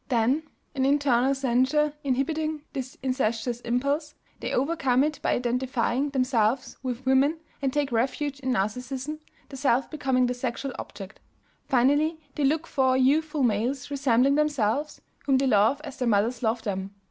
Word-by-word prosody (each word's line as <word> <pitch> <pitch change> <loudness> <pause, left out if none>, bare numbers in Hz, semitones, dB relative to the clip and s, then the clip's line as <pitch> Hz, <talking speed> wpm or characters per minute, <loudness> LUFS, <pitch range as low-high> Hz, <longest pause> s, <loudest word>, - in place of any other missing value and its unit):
Then, 250 +4 +2 0.3
an 270 -3 -1
internal 275 -2 +3
censure 270 +3 +2
inhibiting 300 +3 -1
this 260 -1 -5
incestuous 240 -2 -1
impulse, 280 +6 -1 0.2
they - - -4
overcome 270 -2 +2
it 305 0 -1
by - - +1
identifying 250 +2 0
themselves 255 -3 0
with 255 0 -4
women 270 +4 +3 0.2
and 270 -1 0
taking 285 -2 -1
refuge 275 +4 -1
in 260 -1 -3
Narcissism, 255 +8 -2 0.3
the 270 - -8
self 265 -1 +1
becoming 265 -5 +1
the 250 - 0
sexual 250 +2 -4
object. 195 +1 -9 0.5
Finally 290 +5 +2
they 295 - -2
look 305 +4 +2
for 260 -4 +2
youthful 295 +3 +2
males 245 +5 0
resembling 270 -1 +3
themselves, 290 -2 0 0.2
whom 270 -2 +3
they 270 - +1
love 225 +3 +3
as 280 -4 -8
their 250 - -1
mothers 225 +3 +1
loved 225 0 -1
them. 195 -1 -4
265 Hz, 150 wpm, -26 LUFS, 245-285 Hz, 0.5 s, internal